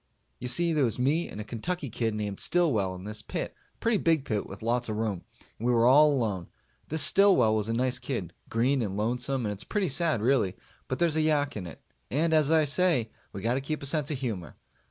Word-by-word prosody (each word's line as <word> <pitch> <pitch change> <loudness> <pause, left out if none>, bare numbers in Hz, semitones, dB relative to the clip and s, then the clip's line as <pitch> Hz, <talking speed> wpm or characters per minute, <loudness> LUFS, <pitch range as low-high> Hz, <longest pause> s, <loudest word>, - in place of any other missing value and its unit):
You 125 - -5
see, 170 +7 +2
there 150 -3 +2
was 115 -4 +3
me 145 +7 +1
and - - -8
a - - -3
Kentucky 140 +6 -4
kid 110 -1 -1
named 105 -2 -4
Stillwell 115 - +1
in 90 - -10
this 105 +1 -3
pit - - -5 0.2
a - - -37
pretty 230 -3 +1
big 160 -5 +1
pit 105 -6 -2
with 100 +3 -10
lots 120 +1 0
of 110 - -2
room 105 -5 -3 0.3
and 115 - -2
we - - +3
were 115 -1 +3
all 150 +4 +6
alone. 105 - -1 0.4
This 160 0 +2
Stillwell 195 - +5
was 110 0 -1
a - - 0
nice 125 +1 0
kid 120 - -4 0.2
green 125 +4 +1
and 100 -3 -3
lonesome 125 +3 -1
and 105 - -1
it's 100 - -7
pretty 200 -5 -1
sad, 155 -2 +1
really, 115 -7 +2 0.3
but 130 - -2
there's 165 -1 +2
a - - +3
yak 150 -2 +1
in 95 -4 -5
it, 85 - -12 0.3
and 160 +4 +1
as 155 -2 +3
I 160 -1 +4
say 145 -6 +1 0.2
we 95 - -8
got 115 - +1
to 135 - -1
keep 150 +2 -4
a - - -3
sense 150 0 +1
of 150 - -2
humor. 110 - -5
125 Hz, 240 wpm, -28 LUFS, 110-155 Hz, 0.4 s, all